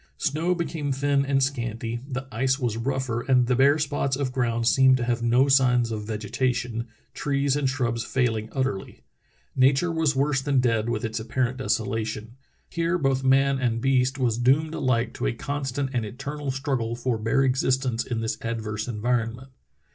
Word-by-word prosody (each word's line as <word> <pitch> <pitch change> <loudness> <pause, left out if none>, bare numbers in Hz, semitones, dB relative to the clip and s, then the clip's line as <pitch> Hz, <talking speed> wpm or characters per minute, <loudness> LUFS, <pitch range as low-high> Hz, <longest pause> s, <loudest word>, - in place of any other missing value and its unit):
Snow 165 +4 0
became 160 -4 -3
thin 140 +1 +1
and 135 -1 +2
scanty, 120 -3 -2
the 135 0 -4
ice 130 +3 +1
was 120 -6 -1
rougher, 125 -1 -2
and 125 -1 +3
the 125 +1 +1
bare 140 +3 +5
spots 145 -3 -1
of 135 -2 -2
ground 115 -2 0
seemed 130 0 +5
to 125 - -2
have 120 0 -1
no 120 +3 +3
signs 125 -4 +3
of 105 -1 -4
vegetation, 120 +2 -2 0.3
trees 140 -1 0
and 145 -2 +1
shrubs 120 -4 -1
failing 115 -3 0
utterl}^. 130 -6 -3 0.6
Nature 135 +6 +3
was 160 -3 +1
worse 140 0 +1
than 140 -1 +1
dead 115 -2 +1
with 115 -1 -2
its 110 +1 -3
apparent 125 +3 -1
desolation. 110 -2 -2 0.4
Here 170 +1 0
both 135 -4 0
man 135 +1 +3
and 120 -3 0
beast 130 +1 +1
was 120 -3 0
doomed 145 +6 +2
alike 130 -6 0
to - - -2
a - - 0
constant 140 -1 -3
and 120 -3 0
eternal 140 +6 -5
struggle 130 -4 -2
for 120 -1 -2
bare 115 +5 +2
existence 130 -2 +1
in 115 -2 -3
this 110 - -3
adverse 110 -1 -3
environment. 120 +2 -2
130 Hz, 170 wpm, -25 LUFS, 115-135 Hz, 0.6 s, bare